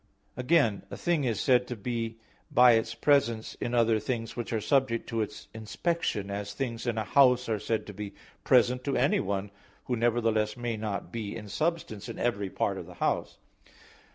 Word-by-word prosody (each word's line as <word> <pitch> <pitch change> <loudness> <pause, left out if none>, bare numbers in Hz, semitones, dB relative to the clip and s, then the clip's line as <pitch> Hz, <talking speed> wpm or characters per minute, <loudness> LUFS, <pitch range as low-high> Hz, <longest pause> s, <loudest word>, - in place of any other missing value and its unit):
Again 125 -5 +2
a - - -7
thing 170 -5 0
is 115 -5 0
said 125 -1 +3
to 125 - -4
be 115 +1 -3 0.3
by 125 0 +7
its 115 0 +1
presence 115 -4 +2
in 120 - -1
other 115 -2 +3
things 115 +1 -3
which 120 -1 -4
are 115 - 0
subject 130 0 +1
to 115 -1 -1
its 105 - -6
inspection; 110 - -2
as 100 0 -4
things 120 -3 -4
in 115 -2 0
a 110 - 0
house 125 0 +4
are 110 -2 0
said 110 +2 -1
to 105 - -8
be 100 0 -7 0.3
present 125 0 +4
to 140 -2 0
anyone, 100 -6 0 0.3
who 125 - -1
nevertheless 115 -2 +1
may 120 -1 -2
not 105 -2 -4
be 110 -3 -4
in 105 -2 -7
substance 150 - -2
in - - -6
every 105 -5 -1
part - - -1
of - - -9
the - - -12
house. - - -1
115 Hz, 185 wpm, -29 LUFS, 110-125 Hz, 0.3 s, by